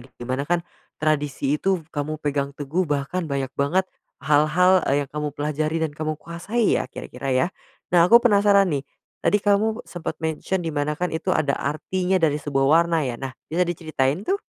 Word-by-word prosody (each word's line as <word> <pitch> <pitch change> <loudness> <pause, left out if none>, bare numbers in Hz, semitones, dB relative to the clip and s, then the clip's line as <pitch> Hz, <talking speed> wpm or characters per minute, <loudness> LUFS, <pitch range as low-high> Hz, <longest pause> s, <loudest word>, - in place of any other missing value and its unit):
di 120 - -10
mana 130 +2 -1
kan, 175 0 +3 0.4
tradisi 145 -2 0
itu 190 -4 0
kamu 150 +1 -3
pegang 140 -2 -1
teguh 150 +6 -1
bahkan 145 +5 -1
banyak 135 -1 -2
banget, 170 +7 +1 0.3
hal-hal 155 +6 +4
yang 140 0 +1
kamu 150 0 -2
pelajari 155 +2 -1
dan 160 -2 -1
kamu 155 0 -3
kuasai 200 +7 -1
ya, - - -4
kira-kira 135 +2 -7
ya? 130 +6 +3 0.5
Nah 170 -1 +7
aku 235 - +9
penasaran 205 -4 +4
nih, 140 -2 -1 0.4
tadi 205 - +3
kamu 215 +3 +2
sempat 165 -2 -5
mention 160 +4 -2
di 160 - -2
mana 145 0 0
kan 180 - 0
itu 170 +3 -2
ada 150 -5 +1
artinya 185 +5 -1
dari 155 -3 +2
sebuah 135 -2 +1
warna 165 +1 +4
ya, 125 - -2
nah 135 -1 -4 0.2
bisa 175 +3 +1
diceritain 155 -3 -1
tuh? 390 - +2
155 Hz, 180 wpm, -23 LUFS, 145-180 Hz, 0.5 s, aku